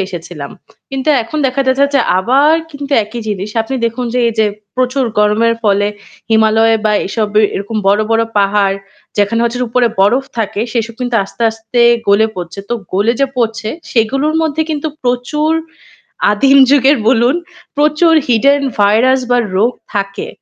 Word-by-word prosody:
এসেছিলাম। 165 -5 -8 0.4
কিন্তু 270 +2 -3
এখন 305 +7 -5
দেখা 260 +1 -1
যাচ্ছে 260 +2 +3
যে 275 - +4 0.2
আবার 275 +10 +3 0.2
কিন্তু 285 -1 -7
একই 230 +3 -7
জিনিস। 205 0 -4
আপনি 265 +4 -5
দেখুন 240 +2 -4
যে 250 - +1
এইযে 220 -1 +1 0.3
প্রচুর 255 +1 0
গরমের 215 +2 +2
ফলে 205 0 +2 0.4
হিমালয় 220 0 +3
বা 215 - +2
এইসব 215 +2 -2
এ - - +3
এরকম 205 +3 -4
বড়, 205 +2 +3
বড় 225 0 +3 0.2
পাহাড় 200 -1 +1 0.4
যেখানে 205 +3 +1
হচ্ছে 235 +1 -2
উপরে 245 +1 +2
বরফ 240 +7 +3
থাকে 210 -2 -2
সেসব 230 -1 -2
কিন্তু 245 -1 -2
আস্তে, 195 - -8
আস্তে 225 +2 -3 0.3
গলে 200 +2 +4
পড়ছে। 175 +1 -7
তো 240 - -1 0.2
গলে 205 +5 +2
যে 275 - +3
পড়ছে 225 -2 -1 0.2
সেগুলোর 270 +7 +1
মধ্যে 315 0 0
কিন্তু 305 0 -2
প্রচুর 250 +6 -1 0.8
আদিম 270 +7 +4
যুগের 280 +1 +4
বলুন 245 +4 +3 0.4
প্রচুর 305 +3 +3
hidden 280 +4 +3 0.2
virus 230 +6 +3
বা 245 - +3 0.2
রোগ 225 +6 +2 0.2
থাকে। 200 -1 -3
230 Hz, 155 wpm, -14 LUFS, 210-265 Hz, 0.8 s, যে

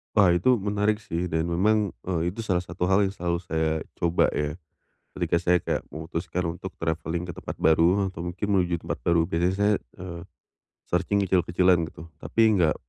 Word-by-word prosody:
Wah 100 -4 +6
itu, 90 +9 +4
menarik 105 0 0
sih. 85 -2 -3
Dan 80 0 -1
memang, 105 +3 +2 0.2
eee, 85 -1 0
itu 110 - -12
salah 90 -4 +1
satu 90 0 -3
hal 95 +2 +4
yang 95 - 0
selalu 85 -2 -1
saya 80 -2 -1
coba 85 0 +2
ya, 75 0 -2 0.6
ketika - - +1
saya 90 0 +3
kayak - - -1
memutuskan 80 +3 -4
untuk 95 0 -7
travelling 80 +1 -2
ke - - -4
tempat - - -6
baru, 85 +5 +4
eh, - - 0
atau 90 - -9
mungkin 90 +4 -3
menuju 90 -3 +2
tempat - - -4
baru, 85 -1 +3
biasanya 85 +1 +1
saya, 100 +1 +3 0.3
eee, 85 -2 -7 0.7
searching 95 +3 +1
kecil-kecilan 90 -1 +3
gitu. 80 +1 -11
Tapi 115 - -1 0.2
nggak 80 -4 +3
90 Hz, 180 wpm, -26 LUFS, 85-95 Hz, 0.7 s, Wah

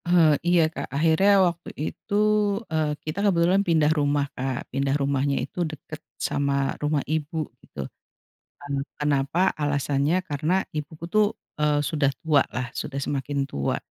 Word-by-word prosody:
Eee, 175 -3 +5 0.2
iya 175 -1 +5
Kak, - - -5
akhirnya 165 +6 +4 0.2
waktu 170 -1 -2 0.2
itu, - - -7 0.6
eee, 150 -2 0
kita 155 +5 -3
kebetulan 185 0 +3
pindah 160 -5 +3
rumah, 145 -2 +1
Kak. 130 -1 -3
Pindah 135 +1 +1
rumahnya 140 0 0
itu 180 - -6
deket 155 -1 -5 0.2
sama 140 -1 0
rumah 150 -1 0
ibu 155 +1 -2 0.2
gitu. 70 - -7 0.8
Nah, 140 -1 -2 0.2
kenapa? 145 +5 +2
Alasannya 145 +3 +1
karena 165 +3 0
ibuku 155 +1 -6
tuh, 215 +1 +4 0.3
eee, 150 -1 +2
sudah 145 -2 +1
tua 150 -4 +4
lah, 125 -1 -3
sudah 140 -1 -4
semakin 140 +1 -2
tua 70 -1 -1
150 Hz, 140 wpm, -25 LUFS, 140-165 Hz, 0.8 s, Eee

